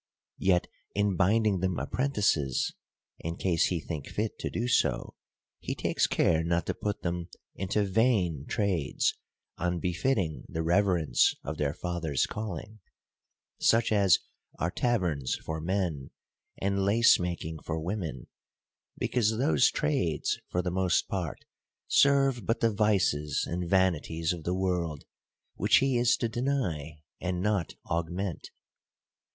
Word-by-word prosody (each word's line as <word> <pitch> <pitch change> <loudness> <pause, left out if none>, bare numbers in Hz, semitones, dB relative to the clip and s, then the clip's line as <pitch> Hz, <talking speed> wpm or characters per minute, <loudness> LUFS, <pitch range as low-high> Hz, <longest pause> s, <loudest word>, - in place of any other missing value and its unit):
Yet 90 -2 +3 0.3
in 100 -1 +2
bind 105 +6 +3
ing 100 -3 +2
them 95 0 -1
apprentices 105 - 0 0.5
(in 85 +1 -4
case 85 -4 +2
he 90 - -1
think 75 -2 -6
fit 105 +1 -3
to - - -2
do 120 - -2
so), 70 - +1 0.5
he - - -4
takes - - +1
care 80 -1 +2
not 85 +1 0
to - - -1
put 105 -1 -4
them 85 -1 -3 0.2
into 95 +2 0
vain 95 - +1
trades, 95 - 0 0.5
unbefitting 90 - -1
the 80 - -2
reverence 85 -6 +3
of 80 +2 -5
their 70 -1 0
father's 85 -6 -1
calling: 110 +1 -6 0.8
such 115 0 +3
as 100 -5 +5 0.4
are 85 +3 -1
taverns 90 - 0
for 80 0 -5
men, 85 -6 -2 0.5
and 100 0 0
lace 115 +4 +5
making 85 -3 -3
for 80 - -3
women; 85 - -4 0.7
because 110 -3 +1
those 80 - +4
trades, 75 +1 0
for 90 - -1
the 90 - -1
most 95 -1 +1
part, 90 -6 -4 0.4
serve 135 -3 +4
but 115 +2 +1
the 115 -1 +2
vices 90 -9 +1
and 85 0 -3
vanities 85 -3 +1
of 85 -3 -8
the 90 - 0
world, 90 -5 -1 0.5
which 105 +4 +4
he 135 -1 +2
is 120 0 +3
to 120 - 0
deny, 95 - -2 0.2
and 90 -1 -2
not 100 -3 0
augment. 85 +3 -3
90 Hz, 135 wpm, -29 LUFS, 80-105 Hz, 0.8 s, as